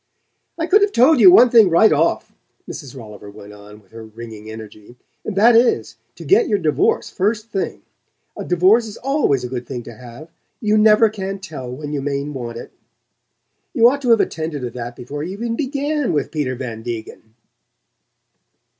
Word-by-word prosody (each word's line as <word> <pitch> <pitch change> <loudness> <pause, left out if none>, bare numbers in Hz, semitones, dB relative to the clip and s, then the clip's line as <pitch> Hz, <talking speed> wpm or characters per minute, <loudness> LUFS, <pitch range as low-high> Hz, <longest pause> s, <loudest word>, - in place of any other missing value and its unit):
"I 330 - -2
could 405 +4 +4
have 405 0 +2
told 265 +4 +4
you 365 - +8
one 250 -10 +6
thing 225 -5 +6
right 170 +3 +4
off," 160 +3 -1 0.3
Mrs. 135 -2 -9
Rolliver 105 -3 -11
went 105 0 -13
on 105 0 -14
with 95 -3 -29
her 115 0 -10
ringing 110 -1 -11
energy. 110 +1 -12 0.3
"And 215 - -5
that 225 +4 +5
is, 235 +2 +1 0.2
to - - -11
get 430 +4 +3
your 205 - +1
divorce 375 - 0
first 215 +3 -2
thing. 195 - -4 0.5
A - - -6
divorce 190 +7 +3
is 210 - -10
always 270 - 0
a - - -3
good 125 -1 -6
thing 125 -3 -6
to 120 - -11
have: 125 +7 -13 0.3
you 215 -2 0
never 215 +1 +5
can 195 -2 -5
tell 155 -10 -8
when 145 +3 -7
you 145 - -2
may 140 0 -3
want 125 -5 -7
it. - - -10 1.0
You 235 -3 +6
ought 280 +1 -4
to 250 - -2
have 230 -2 +5
attended 155 -4 -4
to 120 - -4
that 120 0 -7
before 140 +5 -7
you 175 +5 -5
even 230 +3 -4
BEGAN 285 - -2
with 145 -3 -2
Peter 145 -5 -3
Van 120 -3 -7
Degen." 110 -1 -8
155 Hz, 190 wpm, -19 LUFS, -, 1.0 s, you